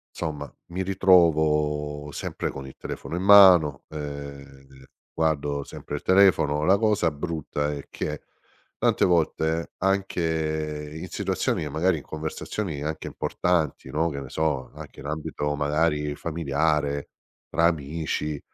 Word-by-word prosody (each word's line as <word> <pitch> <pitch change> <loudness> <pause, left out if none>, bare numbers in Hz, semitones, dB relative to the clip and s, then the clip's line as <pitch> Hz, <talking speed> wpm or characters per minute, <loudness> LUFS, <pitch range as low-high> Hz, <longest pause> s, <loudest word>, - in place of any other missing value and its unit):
Somma, 75 -3 -5 0.2
mi 95 +2 -2
ritrovo 75 -6 +2
sempre - - -4
con 70 0 -7
il 65 - -11
telefono - - -6
in 90 - -2
mano, 95 -8 +7
ehm, 70 -2 -9 0.3
guardo 75 -3 0
sempre - - -7
il - - -5
telefono. 90 -6 +4
La 95 +3 +5
cosa 105 -6 +2
brutta 75 -1 -3
è 70 -1 -7
che 75 -1 -4 0.5
tante - - +2
volte 80 -1 +1
anche 80 -6 -1
in - - -6
situazioni, - - -1
che 75 - -4
magari 80 +4 +1
in 75 - -8
conversazioni 80 +1 -4
anche 75 +1 -4
importanti, 85 -5 -1
no, 80 +2 0
che 70 -3 -5
ne 70 - -7
so, 75 -4 -1
anche - - -11
in - - -10
ambito 75 -1 -3
magari 75 0 0
familiare 75 -2 -1 0.4
tra 85 +1 +2
amici, 75 -1 -2
75 Hz, 135 wpm, -25 LUFS, 75-85 Hz, 0.5 s, mano